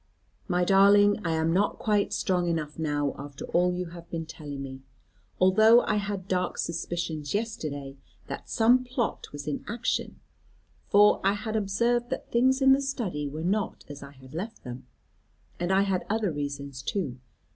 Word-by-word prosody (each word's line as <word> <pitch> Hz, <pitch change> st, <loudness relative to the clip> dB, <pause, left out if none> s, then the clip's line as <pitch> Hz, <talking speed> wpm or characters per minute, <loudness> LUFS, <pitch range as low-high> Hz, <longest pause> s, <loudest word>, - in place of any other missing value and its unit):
"My 180 Hz, -2 st, +1 dB
darling, 205 Hz, +2 st, +5 dB
I 165 Hz, -2 st, 0 dB
am 160 Hz, +1 st, +1 dB
not 200 Hz, +3 st, +1 dB
quite 210 Hz, -2 st, +1 dB
strong 180 Hz, -2 st, 0 dB
enough 155 Hz, -2 st, -2 dB
now 145 Hz, -2 st, 0 dB
after 140 Hz, 0 st, -7 dB
all 180 Hz, +1 st, +2 dB
you 180 Hz, -1 st, -3 dB
have 170 Hz, 0 st, -11 dB
been 165 Hz, -1 st, -4 dB
telling 145 Hz, -3 st, -7 dB
me. 130 Hz, -1 st, -8 dB, 0.6 s
Although 220 Hz, +6 st, +6 dB
I 215 Hz, -, 0 dB
had 200 Hz, -2 st, -3 dB
dark 185 Hz, -1 st, -1 dB
suspicions 165 Hz, -2 st, -3 dB
yesterday 150 Hz, -11 st, -4 dB, 0.3 s
that -, -, -7 dB
some 240 Hz, +3 st, +4 dB
plot 245 Hz, -2 st, -2 dB
was 145 Hz, -1 st, -7 dB
in 145 Hz, -, -3 dB
action; 235 Hz, +3 st, -2 dB, 0.7 s
for 205 Hz, +1 st, +5 dB
I 195 Hz, +1 st, +3 dB
had 215 Hz, +1 st, -4 dB
observed 235 Hz, +4 st, +1 dB
that 260 Hz, -, -5 dB
things 260 Hz, +3 st, +3 dB
in 270 Hz, -, +7 dB
the 275 Hz, -, +2 dB
study 215 Hz, -, -3 dB
were 155 Hz, +3 st, -6 dB
not 200 Hz, +4 st, -1 dB
as 145 Hz, -1 st, -8 dB
I 140 Hz, 0 st, -10 dB
had 130 Hz, 0 st, -15 dB
left 200 Hz, +8 st, -6 dB
them; 125 Hz, 0 st, -8 dB, 0.7 s
and 175 Hz, +2 st, -1 dB
I 190 Hz, +1 st, +4 dB
had 195 Hz, -2 st, 0 dB
other 215 Hz, -3 st, 0 dB
reasons 140 Hz, -2 st, -5 dB
too. 135 Hz, -5 st, -3 dB
180 Hz, 170 wpm, -27 LUFS, 150-210 Hz, 0.7 s, in